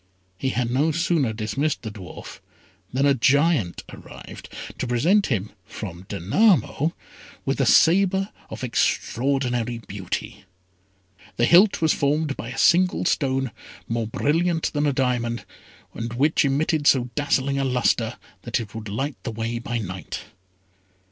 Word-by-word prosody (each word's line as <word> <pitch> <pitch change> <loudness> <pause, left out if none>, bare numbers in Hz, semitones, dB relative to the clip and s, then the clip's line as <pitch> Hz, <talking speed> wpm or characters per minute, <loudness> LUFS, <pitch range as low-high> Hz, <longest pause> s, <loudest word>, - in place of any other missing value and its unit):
He 130 +8 -2
had 120 -2 -1
no 145 +6 +2
sooner 165 -6 +1
dismissed 125 +8 -2
the 110 - -5
dwarf 95 -5 -10 0.5
than 135 +3 +1
a 140 - +5
giant 135 - +2
arrived - - -11 0.3
to 130 - -2
present 170 - +3
him, 105 -5 -2
from 95 -3 -8
Danamo, 155 - +2 0.5
with - - 0
a - - +2
sabre 195 +3 +4 0.2
of - - -7
extraordinary 125 -1 0
beauty. 100 -4 -6 0.9
The 120 - +3
hilt 180 - +5
was 160 - +4
formed 145 +1 0
by 115 - -6
a 125 - -7
single 180 +1 +3
stone, 135 -6 0 0.4
more 115 -1 -1
brilliant 165 +7 0
than 145 0 +1
a - - +3
diamond, 125 -3 -1 0.5
and 115 0 -5
which 145 +7 +2
emitted 145 +2 +1
so 125 -2 +3
dazzling 140 -1 0
a - - +1
lustre 125 -2 +1 0.2
that - - -1
it 110 -3 -7
would 110 -2 -7
light 135 +8 -3
the - - -5
way 115 +1 -3
by 120 0 -3
night. 90 -6 -5
130 Hz, 140 wpm, -24 LUFS, 115-150 Hz, 0.9 s, a